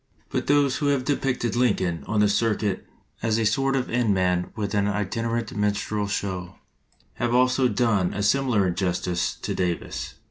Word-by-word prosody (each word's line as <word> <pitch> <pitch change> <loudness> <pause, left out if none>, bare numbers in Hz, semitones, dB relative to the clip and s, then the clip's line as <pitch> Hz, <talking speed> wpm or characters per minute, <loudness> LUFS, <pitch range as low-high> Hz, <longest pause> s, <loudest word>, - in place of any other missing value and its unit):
But - - -2
those 145 -2 +3
who 145 - -1
have 140 -3 +1
depicted 130 -4 0
Lincoln 95 -9 +1
on 105 0 +1
the 105 - +5
circuit 105 -2 0 0.3
as 110 -1 +1
a 115 - +1
sort 135 +5 +2
of 130 -1 0
end 115 -4 +2
man 90 -1 +1
with 105 -2 -3
an 100 -1 +2
itinerant 115 +3 -2
minstrel 105 0 -1
show, 95 -3 -3 0.6
have 120 0 0
also 125 +1 +4
done 110 -5 +1
a 105 - -3
similar 120 -2 +2
injustice 90 -1 -1
to - - -4
Davis. 90 -2 -3
105 Hz, 165 wpm, -25 LUFS, 95-125 Hz, 0.6 s, the